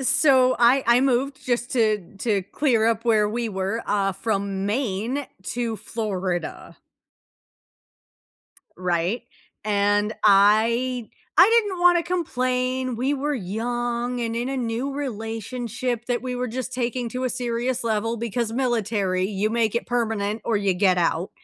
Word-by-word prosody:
So 265 -1 +4
I 245 +3 +5
I 235 +1 +5
moved 270 +1 0
just 240 -1 -1
to 215 -6 0
to 205 -3 0
clear 225 +2 +1
up 230 0 0
where 215 -2 +3
we 235 +1 -2
were, 195 +3 -2
uh, 195 -1 +1
from 195 -1 -2
Maine 235 +4 -1 0.3
to 235 -2 -1
Florida. 190 -7 -4 2.0
Right? 180 +5 -1 0.4
And 205 0 +2
I 220 +4 +4 0.3
I 460 +3 +7
didn't 380 -4 -5
wanna 350 -1 +5
complain, 255 -7 -1
we 265 +5 0
were 290 +2 -1
young 240 +3 -2
and 230 -1 -2
in 240 +2 -2
a 270 - -2
new 245 +2 -2
relationship 240 -1 -4
that 245 -1 0
we 255 -1 -3
were 250 0 -2
just 255 +2 -4
taking 245 -1 -2
to 255 +2 -3
a 255 - 0
serious 245 0 -2
level 225 +1 0
because 235 0 -2
military, 220 -7 0
you 205 +1 -1
make 230 -1 +1
it - - -2
permanent 220 -3 -1
or 225 - +1
you 200 -2 +1
get 185 -1 +3
out. 170 +1 0
235 Hz, 145 wpm, -24 LUFS, 210-255 Hz, 2.0 s, I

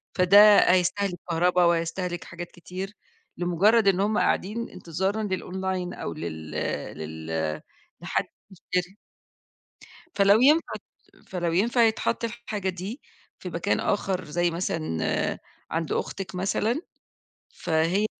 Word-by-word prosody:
فده 200 +3 +8
هيستهلك 185 +1 +1
كهربا 180 +2 +3
وهيستهلك 170 +1 0
حاجات 175 0 -8
كتير 185 +3 -7 0.4
لمُجرّد 200 +5 +3
إن 190 -1 +4
هم 210 +2 +1
قاعدين 225 +5 0
انتظارًا 190 +6 -2
للأونلاين 185 -1 -3
أو 85 - -5
لل 80 -1 -6 0.5
لل 80 0 -4 0.4
لحد - - -1 0.3
يشتري. 180 +1 -3 1.2
فلو 200 +2 +5
ينفع 305 +5 +4
ت - - -10 0.4
فلو 175 -2 -2
ينفع 235 +6 +3
يتحط 225 +1 +1
الحاجة 215 -4 -3
دي 190 - -6 0.4
في - - -6
مكان - - 0
آخَر 185 -2 -1
زي 175 +3 0
مثلًا 160 - -1 0.3
عند 165 -1 -2
أختِك 185 -2 -3
مثلًا، 215 - 0 0.7
فهي 165 +6 +1
185 Hz, 110 wpm, -26 LUFS, 170-205 Hz, 1.2 s, فده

